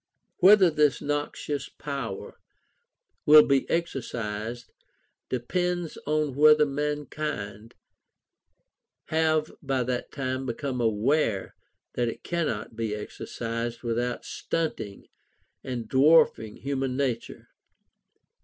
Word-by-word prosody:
Whether 190 -1 +7
this 150 -3 +3
noxious 145 -1 -3
power 135 -9 -6 0.9
will 150 0 +9
be 140 -1 +2
exercised, 120 -7 -3 0.6
depends 175 +7 -1
on 150 -2 +1
whether 150 +2 +6
mankind 145 -7 -4 1.3
have 155 -1 +2
by 135 -3 0
that 125 0 -3
time 130 -1 -3
become 125 +1 -3
aware 115 0 +1 0.4
that 120 - 0
it 115 - -5
cannot 155 -11 -2
be 110 -2 -2
exercised 115 +2 -5
without 120 +1 -2
stunting 155 -11 -3 0.6
and 120 -4 -4
dwarfing 135 -5 +4
human 135 -2 -2
nature. 125 -5 -3
135 Hz, 90 wpm, -27 LUFS, 115-150 Hz, 1.3 s, will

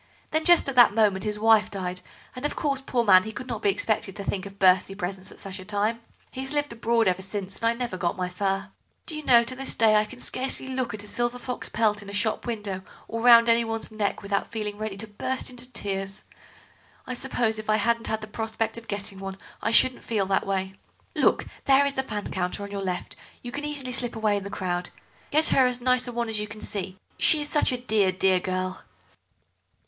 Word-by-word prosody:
Then 315 0 0
just 345 -4 +6
at 275 - -1
that 240 -4 +6
moment 205 -3 +2
his 210 0 -1
wife 220 0 +4
died, 185 -2 -4 0.3
and, 255 - -7
of 295 - -1
course, 280 -4 -1
poor 250 -3 0
man, 190 -4 +7
he 220 - -6
could 245 +4 -7
not 230 -4 -5
be 205 - +3
expected 205 -1 -1
to 200 - -4
think 195 -1 -3
of 195 0 -14
birthday 190 0 +4
presents 190 0 -4
at - - -14
such 195 -1 -6
a - - -8
time. 210 +3 -1 0.3
He 260 - -5
has 270 +2 -4
lived 290 -4 -1
abroad 230 -1 +1
ever 185 0 +1
since, 195 0 -3
and 230 - -4
I 230 - +3
never 235 -5 -4
got 175 0 -1
my 180 -1 -1
fur. 195 +2 -2 0.4
Do 315 - -4
you 305 - -5
know, 240 -4 +6
to 255 +2 -3
this 270 +1 -1
day 220 -2 +5
I 210 - +3
can 250 +3 -12
scarcely 260 +1 0
look 255 -4 -2
at 205 - -5
a - - -10
silver 240 +2 -1
fox 250 0 -5
pelt 210 -2 +1
in 200 - -10
a - - -8
shop 215 +3 -1
window 210 -5 -3 0.3
or 230 0 -4
round 235 -1 +8
anyone's 230 -1 +1
neck 210 -1 -2
without 200 0 -2
feeling 210 -2 -4
ready 215 -2 -4
to 220 +2 -5
burst 255 +6 -3
into 250 0 -5
tears. 195 -3 -3 0.8
I 255 - -4
suppose 240 -3 -1
if 215 - -8
I 215 - +5
hadn't 230 +2 +1
had 220 0 -2
the 215 - -7
prospect 225 +1 -3
of 230 - -19
getting 200 -1 -4
one 195 0 -6 0.2
I - - 0
shouldn't 255 +2 +4
feel 210 -4 0
that 195 0 0
way. 190 -1 -1 0.4
Look, - - +3 0.2
there 275 +1 +5
is 280 - 0
the 265 - 0
fan 210 -6 -5
counter, 185 +2 -2
on 200 - -7
your 200 -1 -4
left; 185 -2 -4 0.3
you 245 - -6
can 290 +3 -4
easily 285 -4 -3
slip 245 -2 -1
away 215 -2 +1
in 200 - -2
the 200 - -6
crowd. 180 -3 -3 0.4
Get 310 +2 +3
her 260 -1 +5
as 250 0 -2
nice 255 0 +2
a - - -4
one 235 0 -2
as 220 -1 0
you 210 - -3
can 210 +1 -9
see—she 195 - 0
is 295 - -2
such 295 - +3
a 250 - -1
dear, 215 -6 +2
dear 185 0 +3
girl." 185 0 -3
215 Hz, 235 wpm, -26 LUFS, 195-245 Hz, 0.8 s, round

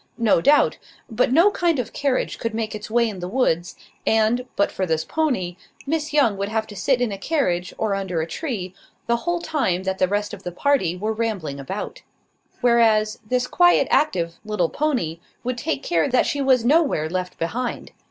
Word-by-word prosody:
No 225 -8 +3
doubt; 290 - +4 0.3
but 240 +2 +1
no 340 +9 +5
kind 345 -5 +1
of 240 -3 -3
carriage 280 -3 -1
could 230 -1 -3
make 220 -1 -2
its 210 0 -7
way 235 +1 +3
in 205 -4 -6
the 180 - -4
woods; 180 -6 0 0.3
and, 225 +3 +2
but 200 - +1
for 185 - -2
this 160 -1 0
pony, 245 - -1 0.3
Miss 305 +1 -1
Young 275 -9 +3
would 200 +1 -2
have 220 0 -1
to 210 - -11
sit 245 +6 +1
in 245 -3 +1
a 195 - -5
carriage, 180 - 0
or 215 -2 0
under 190 -4 -2
a 160 - 0
tree, 190 - -4 0.3
the 235 0 +2
whole 345 +7 -1
time 195 - -1
that 190 0 -2
the 185 - +3
rest 205 +2 -2
of - - -8
the 180 - -5
party 185 - +1
were 215 +4 -1
rambling 210 -11 -3
about; 190 +10 -6 0.6
whereas, 225 -3 +3
this 250 0 +1
quiet 350 +6 +4
active 170 - +1
little 210 -6 0
pony 245 - -1 0.2
would 245 0 -2
take 140 -11 -2
care 170 +7 +1
that 250 -1 +3
she 285 - -1
was 260 -3 +3
nowhere 275 - +3
left 180 +2 -4
behind. 240 +9 -3
220 Hz, 195 wpm, -22 LUFS, 185-260 Hz, 0.6 s, no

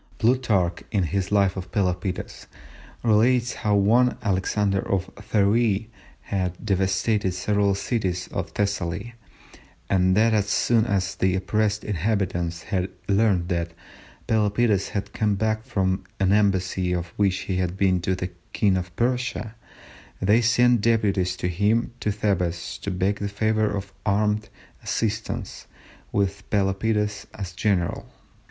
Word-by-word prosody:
Plutarch, 110 -8 +1
in 100 -4 +1
his 95 +3 -2
Life 100 -2 +3
of 95 -2 -7
Pelopidas, 90 -2 -2 0.6
relates 120 +2 +3
how 105 -1 0
one, 115 +5 +3
Alexander 100 0 +1
of 95 -1 -2
Pheræ, 105 +1 +1 0.3
had 90 -2 -2
devastated 95 0 +1
several 100 +1 +1
cities 95 -4 -2
of - - -3
Thessaly, 100 +2 -2 0.8
and 95 0 +3
that 110 +1 +4
as 105 -2 +2
soon 115 +1 +2
as 95 -4 0
the 95 0 +1
oppressed 105 +2 0
inhabitants 90 -4 -1
had 95 -2 -1 0.2
learned 100 -4 +2
that 85 -2 -2 0.5
Pelopidas 105 -2 +2
had 100 - -4
come 105 -2 +1
back 110 +2 0
from 95 -6 0 0.2
an 95 -1 +2
embassy 95 -3 +2
on 85 - -1
which 100 -2 +1
he 95 - -2
had 90 0 -1
been 95 -2 +2
to 95 +2 0
the 90 0 -4 0.2
King 100 -3 +2
of 90 -1 -5
Persia, 125 -2 -1 0.7
they 105 +5 +4
sent 120 0 +4
deputies 100 -5 +1
to - - -2
him 105 +7 +1
to 105 - 0
Thebes 90 -5 -1
to - - -4
beg 95 +2 0
the 100 - -2
favour 110 +1 +1
of 100 -1 -5
armed 105 +1 +1 0.3
assistance, 110 -1 -3 0.4
with 100 -1 -1
Pelopidas 105 +1 0
as 95 -4 -5
general. 90 -2 -1
100 Hz, 135 wpm, -24 LUFS, 95-110 Hz, 0.8 s, that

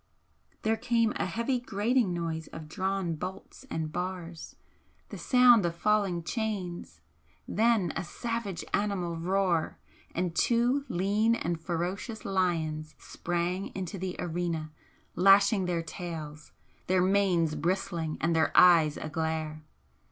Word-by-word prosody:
There 220 +1 +2
came 230 -1 +1
a - - -1
heavy 245 +2 -1
grating 230 -1 +1
noise 165 -2 -3
of 160 -1 -9
drawn 190 0 -1
bolts 185 - -8
and 160 - -3
bars 175 -1 -5 0.5
the - - -7
sound 250 -4 +6
of 170 -1 -1
falling 195 -3 +1
chains 195 -4 -4 0.5
then 220 -6 +2
a - - -2
savage 230 +1 -4
animal 195 -5 0
roar 180 -1 0 0.4
and 175 -1 -1
two 245 +4 +2
lean 205 +5 +2
and 170 -6 -3
ferocious 180 +7 -3
lions 160 -5 -1
sprang 175 +2 -3
into 190 0 -4
the 185 0 -3
arena, 165 -2 -3 0.4
lashing 195 +2 +5
their 170 -2 -1
tails, 155 -3 -7 0.4
their 185 0 +3
manes 185 -5 +2
bristling 170 0 -2
and 165 +1 +1
their 160 -1 +2
eyes 165 -4 +6
aglare. 155 0 -3
180 Hz, 120 wpm, -29 LUFS, 165-205 Hz, 0.5 s, sound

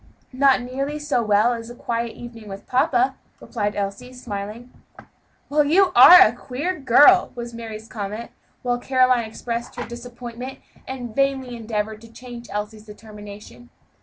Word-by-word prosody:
"Not 265 -1 +3
nearly 275 +4 -4
so 295 -5 -1
well 215 +2 +3
as 230 0 -7
a 240 - -10
quiet 235 -1 -3
evening 230 -3 -11
with 195 0 -9
papa," 255 +1 +2 0.3
replied 210 -3 -3
Elsie, 200 +5 -4
smiling. 230 0 -7 0.8
"Well, 295 +1 +2
you 360 +6 +3
are 345 +9 +10
a 215 - +6
queer 280 +9 -4
girl!" 290 +8 +6
was 235 -1 -7
Mary's 225 -1 -8
comment, 215 +1 -6 0.3
while 245 -1 0
Caroline 255 -2 +2
expressed 235 +2 -6
her - - -5
disappointment 240 +2 -8 0.3
and 245 -4 -7
vainly 270 -3 0
endeavored 220 -1 -4
to 230 -1 -15
change 240 0 -11
Elsie's 210 +1 -6
determination. 210 - -12
240 Hz, 145 wpm, -22 LUFS, 215-255 Hz, 0.8 s, are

